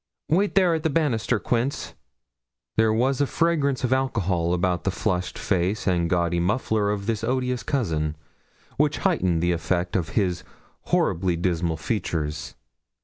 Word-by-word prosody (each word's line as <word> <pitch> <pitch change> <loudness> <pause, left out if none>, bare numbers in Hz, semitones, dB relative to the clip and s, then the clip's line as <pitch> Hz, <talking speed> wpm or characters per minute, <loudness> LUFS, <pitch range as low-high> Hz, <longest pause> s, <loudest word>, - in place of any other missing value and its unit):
'Wait 195 +6 +2
there 185 -3 +4
at 160 - 0
the 160 - +1
banister, 140 -7 +1
Quince.' 125 +4 -1 0.8
There 110 0 +4
was 130 +5 +1
a 145 - +2
fragrance 150 -6 +1
of 125 0 +2
alcohol 95 -10 0
about 90 0 0
the - - +1
flushed 90 -1 -2
face 95 +2 0
and 85 -3 +1
gaudy 85 -1 +1
muffler 105 +2 +1
of 100 -1 -2
this 110 0 -1
odious 125 0 0
cousin, 80 - -1 0.6
which - - +2
heightened 85 -2 +2
the 90 - +2
effect 85 +1 -1
of 85 -4 0
his 90 -5 +1 0.4
horribly 90 0 +1
dismal 85 -1 0
features. 75 - -3
100 Hz, 145 wpm, -24 LUFS, 85-125 Hz, 0.8 s, there